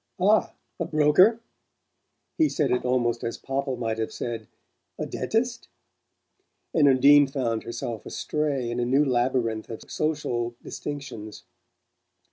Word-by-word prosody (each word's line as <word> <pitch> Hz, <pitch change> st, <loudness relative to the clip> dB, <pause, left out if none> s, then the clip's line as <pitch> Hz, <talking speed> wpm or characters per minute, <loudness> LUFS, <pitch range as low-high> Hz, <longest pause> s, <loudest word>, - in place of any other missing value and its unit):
"Ah? 205 Hz, +4 st, +3 dB, 0.3 s
A 170 Hz, -, 0 dB
broker?" 160 Hz, +10 st, +4 dB, 1.0 s
He 315 Hz, -2 st, +3 dB
said 150 Hz, -3 st, 0 dB
it 125 Hz, -, +1 dB
almost 120 Hz, -2 st, 0 dB
as 115 Hz, -, -3 dB
Popple 135 Hz, -1 st, -3 dB
might 115 Hz, -2 st, -2 dB
have 110 Hz, -, -2 dB
said 115 Hz, -3 st, -5 dB, 0.5 s
"A -, -, -3 dB
DENTIST?" 235 Hz, +1 st, -2 dB, 1.1 s
and 150 Hz, -3 st, +5 dB
Undine 140 Hz, +2 st, +6 dB
found 125 Hz, -5 st, -1 dB
herself 115 Hz, -1 st, -5 dB
astray 140 Hz, -6 st, -2 dB
in 120 Hz, -, -2 dB
a 120 Hz, -, +1 dB
new 135 Hz, +4 st, +3 dB
labyrinth 120 Hz, -3 st, 0 dB
of 115 Hz, -, -7 dB
social 120 Hz, -6 st, -1 dB
distinctions. 135 Hz, -8 st, -7 dB
130 Hz, 125 wpm, -26 LUFS, 120-150 Hz, 1.1 s, Undine